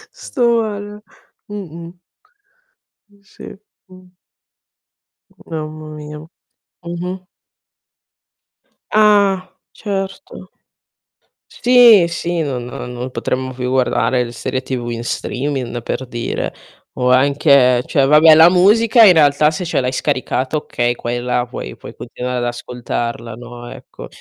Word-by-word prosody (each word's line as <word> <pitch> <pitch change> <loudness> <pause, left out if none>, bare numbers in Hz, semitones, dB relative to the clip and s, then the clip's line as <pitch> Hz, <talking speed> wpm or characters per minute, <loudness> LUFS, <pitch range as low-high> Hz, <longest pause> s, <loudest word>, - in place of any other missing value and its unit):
Sto 235 - 0
male. 210 -1 -6 0.5
Mh-mh. 175 -3 -9 1.1
Mh, 200 0 -26
sì, 195 - -12 0.3
mh. 185 -1 -17 1.4
Mamma 155 -1 -6
mia. 150 0 -9 0.7
Mh-mh. 180 +2 -6 1.7
Ah, 200 -3 +3 0.2
certo. 195 +3 -6 1.0
Sì, 240 -7 +6
sì 170 0 -3
non 130 -5 -3
non 125 +1 -7
potremmo 130 0 -3
più 125 0 -4
guardare 125 -1 +1
le 120 - -7
serie 130 +2 -4
TV 125 -2 -4
in 115 0 -5
streaming 125 -1 -3
per 130 +1 -4
dire 120 -1 -4 0.4
o 125 0 0
anche 135 -2 +4
cioè, 140 -2 +2
vabbè 155 +2 +7
la 160 +2 +8
musica 225 +6 +5
in 185 - +8
realtà 150 -1 +4
se 170 +4 -4
ce 165 - -1
l'hai 125 0 -1
scaricata 130 0 -2
okay, 120 -4 -2
quella 120 +1 -2
puoi 65 - -8
puoi - - -11
continuare 125 +1 -5
ad 120 - -2
ascoltarla 120 -1 -5
no, 120 0 -10
ecco. - - -11
150 Hz, 115 wpm, -17 LUFS, 125-185 Hz, 1.7 s, la